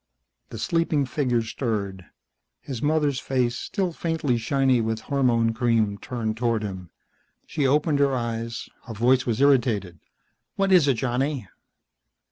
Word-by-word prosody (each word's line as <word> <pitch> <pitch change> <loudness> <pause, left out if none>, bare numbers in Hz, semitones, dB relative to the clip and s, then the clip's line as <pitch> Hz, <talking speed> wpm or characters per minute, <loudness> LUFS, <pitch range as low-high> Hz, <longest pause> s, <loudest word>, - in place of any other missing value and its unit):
The - - -7
sleeping 165 -4 +1
figure 125 -4 0
stirred. 100 -6 -3 0.5
His 130 -5 -6
mother's 145 -3 +1
face, 125 -2 0
still 190 - -2
faintly 160 -6 -1
shiny 130 +1 +2
with 110 0 -2
hormone 120 -5 +1
cream, 110 -4 +1
turned 110 -3 -3
toward 115 -2 0
him. 95 -4 -6 0.6
She 145 -4 0
opened 150 +1 +2
her 140 -1 +3
eyes. 115 -1 -4 0.2
Her 115 - -7
voice 125 +4 +3
was 115 -1 0
irritated. 115 - +2 0.6
"What 195 0 +1
is 175 -6 +6
it, 135 - +3
Johnny?" 125 0 -1
125 Hz, 135 wpm, -25 LUFS, 115-140 Hz, 0.6 s, is